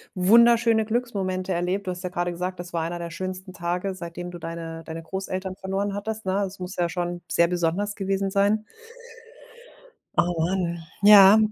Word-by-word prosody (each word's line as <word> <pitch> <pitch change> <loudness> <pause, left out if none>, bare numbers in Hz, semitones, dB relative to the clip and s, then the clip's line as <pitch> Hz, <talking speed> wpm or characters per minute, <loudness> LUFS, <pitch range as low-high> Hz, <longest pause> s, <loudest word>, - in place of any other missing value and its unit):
wunderschöne 230 +3 +5
Glücksmomente 195 -6 -2
erlebt. 180 +3 -1
Du - - 0
hast 180 +1 -7
ja 180 - -2
grade 175 0 -2
gesagt: 180 +1 -4
„Das 175 0 -8
war 165 - 0
einer 170 +1 -4
der 170 - -5
schönsten 185 +2 -6
Tage, 180 +3 -2
seitdem 175 0 -7
du 175 - -7
deine 165 0 -6
deine 165 0 -7
Großeltern 185 +2 -4
verloren 195 +2 -2
hattest“, 220 +2 -5
ne? 190 +2 +1
Es 190 0 -9
muss 180 +1 -6
ja 175 -1 0
schon 175 0 -3
sehr 170 - +4
besonders 180 +4 -1
gewesen 195 -1 -1
sein. 205 +2 +2 1.5
Oh 175 +1 +3
man. 170 0 0 0.2
Ja. 205 0 +9
185 Hz, 170 wpm, -25 LUFS, 175-200 Hz, 1.5 s, Ja